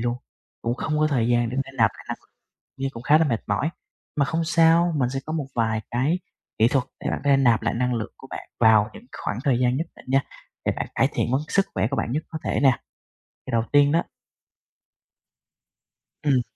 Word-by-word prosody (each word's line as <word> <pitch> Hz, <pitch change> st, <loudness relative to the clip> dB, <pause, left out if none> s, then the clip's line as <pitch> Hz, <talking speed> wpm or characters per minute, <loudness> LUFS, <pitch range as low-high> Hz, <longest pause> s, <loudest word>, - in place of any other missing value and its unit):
luôn, 120 Hz, +1 st, 0 dB, 0.5 s
cũng 120 Hz, +1 st, 0 dB
không 150 Hz, +2 st, -2 dB
có 155 Hz, -, +4 dB
thời 120 Hz, -6 st, +1 dB
gian 120 Hz, -1 st, +2 dB
để 125 Hz, -, -4 dB
nạp 135 Hz, -5 st, +1 dB
lại -, -, -13 dB
năng -, -, -3 dB
lượng, -, -, -30 dB, 0.5 s
với 135 Hz, -, 0 dB
cũng 115 Hz, -, -8 dB
khá 150 Hz, +1 st, +6 dB
là 160 Hz, -, +3 dB
mệt 120 Hz, -6 st, 0 dB
mỏi. 105 Hz, +9 st, 0 dB, 0.5 s
Mà 140 Hz, -, +3 dB
không 165 Hz, +3 st, -1 dB
sao, 165 Hz, +1 st, +4 dB
mình 125 Hz, -3 st, +1 dB
sẽ 135 Hz, -, -2 dB
có 155 Hz, -, -4 dB
một 150 Hz, -4 st, -1 dB
vài 110 Hz, -2 st, +1 dB
cái 140 Hz, +9 st, +1 dB, 0.4 s
kỹ 110 Hz, -, +6 dB
thuật 135 Hz, -1 st, +1 dB
để -, -, -2 dB
bạn -, -, -2 dB
có 145 Hz, -, +1 dB
thể 135 Hz, -, +6 dB
nạp 120 Hz, -5 st, +4 dB
lại 115 Hz, -, 0 dB
năng 125 Hz, +1 st, 0 dB
lượng 115 Hz, -2 st, -3 dB
của 135 Hz, -, -13 dB
bạn -, -, -8 dB
vào 110 Hz, -1 st, +5 dB
những 235 Hz, -, -12 dB, 0.2 s
khoảng 105 Hz, -, -1 dB
thời 130 Hz, -4 st, +2 dB
gian 125 Hz, +1 st, +2 dB
nhất 165 Hz, +1 st, -2 dB
định -, -, -16 dB
nha, 135 Hz, -, +4 dB, 0.5 s
để -, -, +3 dB
bạn -, -, -3 dB
cải -, -, +4 dB
thiện -, -, 0 dB, 0.2 s
sức 195 Hz, 0 st, +2 dB
khỏe 110 Hz, -, +1 dB
của -, -, 0 dB
bạn 115 Hz, -, -1 dB
nhất 155 Hz, +4 st, -1 dB
có 160 Hz, -, -4 dB
thể -, -, 0 dB
nè. 135 Hz, -, +7 dB, 0.8 s
Thì -, -, -4 dB
đầu 115 Hz, -1 st, +2 dB
tiên 145 Hz, 0 st, +5 dB
đó 165 Hz, +2 st, +3 dB, 2.2 s
Ừm. 135 Hz, -4 st, +3 dB
135 Hz, 230 wpm, -24 LUFS, 120-155 Hz, 2.2 s, nè